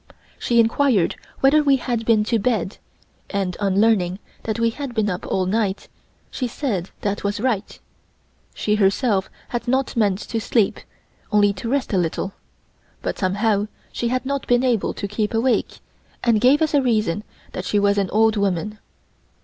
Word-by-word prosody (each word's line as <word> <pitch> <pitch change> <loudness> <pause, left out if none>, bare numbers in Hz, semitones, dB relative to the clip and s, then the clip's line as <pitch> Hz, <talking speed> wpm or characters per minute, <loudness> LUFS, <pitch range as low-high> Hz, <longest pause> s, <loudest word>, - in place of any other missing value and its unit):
She 235 -1 +2
inquired 230 -4 +3 0.3
whether 280 +3 +5
we 280 -2 +4
had 240 -3 -2
been 220 -2 +4
to 230 +1 +1
bed 210 -3 -1 0.5
and, 195 -3 -2
on 195 -1 +1
learning 195 -5 +3 0.2
that 220 0 -3
we 230 0 +2
had 270 -1 -6
been 210 -2 +1
up 180 - -5
all 190 -1 0
night, 200 0 -1 0.4
she 255 - -2
said 220 - -3
that 205 0 -2
was 200 0 -1
right. 225 -4 -1 0.8
She 210 - 0
herself 200 0 +2 0.2
had 240 -1 -3
not 265 +1 0
meant 205 -5 +2
to 225 - -1
sleep, 220 -2 +1 0.5
only 205 -1 +4
to 200 +4 -5
rest 275 -3 -1
a 190 - +3
little, 175 +3 -2 0.7
but - - -3
somehow 205 +2 +1 0.2
she 240 - -2
had 255 +1 -1
not 280 0 -2
been 245 +1 +3
able 240 -5 +1
to 200 - -4
keep 210 +2 -2
awake, 240 +3 0 0.4
and 230 -3 +3
gave 275 +6 +5
as 310 - 0
a 285 - +4
reason 215 -6 0 0.3
that 185 - -5
she 205 - 0
was 200 0 +3
an 195 -2 0
old 220 +1 +3
woman. 200 +1 -1
215 Hz, 175 wpm, -22 LUFS, 200-245 Hz, 0.8 s, whether